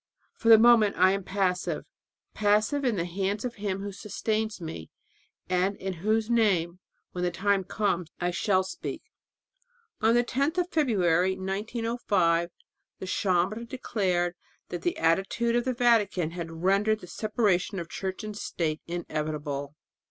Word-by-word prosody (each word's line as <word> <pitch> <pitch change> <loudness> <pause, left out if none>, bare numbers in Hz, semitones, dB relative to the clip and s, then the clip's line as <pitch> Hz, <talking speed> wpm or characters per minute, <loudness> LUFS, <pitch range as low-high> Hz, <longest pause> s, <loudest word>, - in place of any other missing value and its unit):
For 230 - -1
the 225 - +10
moment 225 -2 +5
I 185 +1 +6
am 195 0 -1
passive 185 -1 -1 0.5
passive 215 +7 +2
in 245 -4 +1
the 170 -3 -1
hands 195 +5 -2
of 245 - -3
Him 200 -2 -3
who 205 - -4
sustains 215 +1 -2
me, 160 - -7 0.6
and 185 +2 +1
in 190 0 -4
whose 215 +2 +1
name 190 -7 +2 0.3
when 180 - -4
the 180 - +2
time 200 +1 +1
comes 185 -3 -1
I 175 0 0
shall 185 +2 +2
speak." 190 - -6 1.0
On 225 +2 +4
the 240 - +4
10th 280 +7 -1
of 360 0 0
February, 190 - +2
1905, 200 -3 0 0.5
the - - -7
Chambre 190 +3 0
declared 190 -8 -1 0.4
that 175 - -4
the 175 - -1
"attitude 195 +8 +1
of 240 +1 +1
the 255 - 0
Vatican" 210 -9 +2
had 170 -1 -5
rendered 205 +3 +2
the - - -9
separation 205 0 0
of 170 -2 -4
church 190 +4 -5
and 215 -1 -6
state 160 -6 -2
inevitable. 150 -4 -4
195 Hz, 150 wpm, -27 LUFS, 175-220 Hz, 1.0 s, the